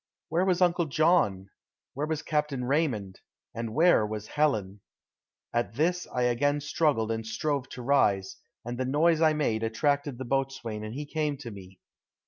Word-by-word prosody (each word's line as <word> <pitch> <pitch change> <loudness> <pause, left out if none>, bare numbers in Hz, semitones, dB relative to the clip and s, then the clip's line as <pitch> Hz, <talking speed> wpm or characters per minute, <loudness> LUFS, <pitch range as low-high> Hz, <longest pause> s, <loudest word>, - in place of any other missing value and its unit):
Where 170 +4 +1
was 185 -1 +3
Uncle 175 -2 +2
John, 135 - +2 0.4
where 145 +3 -2
was 155 -1 -2
Captain 150 -5 -1
Raymond, 125 - -1 0.3
and 115 -1 -5
where 165 -6 +5
was 105 0 -4
Helen? 105 -10 0 0.7
At 120 -2 -1
this 175 +5 0
I 125 - 0
again 145 +4 +2
struggled 145 -6 +1
and 115 0 -2
strove 140 +4 -2
to 125 - -8
rise, 105 -8 +2 0.3
and 120 +1 -5
the 130 - 0
noise 155 +5 +3
I 160 -1 +5
made 125 -8 0
attracted 140 +4 0
the 130 - -5
boatswain 130 -5 -2
and 110 +2 -6
he 150 +2 -4
came 150 -1 -2
to 130 -4 -8
me. 95 -2 -12
135 Hz, 165 wpm, -28 LUFS, 110-155 Hz, 0.7 s, where